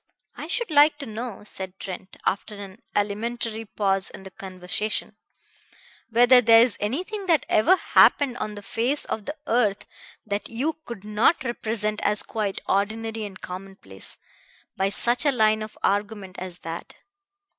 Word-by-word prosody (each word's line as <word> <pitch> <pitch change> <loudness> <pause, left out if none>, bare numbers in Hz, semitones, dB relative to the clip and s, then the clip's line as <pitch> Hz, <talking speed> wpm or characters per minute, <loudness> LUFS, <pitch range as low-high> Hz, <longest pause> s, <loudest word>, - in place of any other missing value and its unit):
"I - - -7
should 475 -7 -2
like 295 0 +6
to 285 - -6
know," 225 -1 -6
said 190 -2 0
Trent 185 0 -7
after 205 +2 -1
an 200 0 -10
alimentary 220 +2 -1
pause 195 -2 0
in - - -11
the 190 - -10
conversation, 185 +3 -3 0.9
"whether 245 +2 +6
there 230 0 +7
is 240 -3 +2
anything 370 - -3
that 325 -6 +3
ever 330 - +5
happened 275 -8 +4
on 210 -2 -4
the 205 - -9
face 245 +8 0
of 215 - -4
the 295 - -4
earth 220 -6 +1 0.4
that 205 -1 -3
you 275 +8 -1
could 235 -5 -8
not 215 +9 +2
represent 220 -3 -2
as 210 0 +1
quite 210 -3 -3
ordinary 220 +2 -1
and 190 -2 -10
commonplace, 180 - -7 0.6
by 195 +1 +1
such 240 +6 +2
a 290 - +4
line 215 -3 +3
of 215 0 -7
argument 205 -2 -1
as 180 -1 -7
that. 165 +1 -7
215 Hz, 155 wpm, -25 LUFS, 195-240 Hz, 0.9 s, there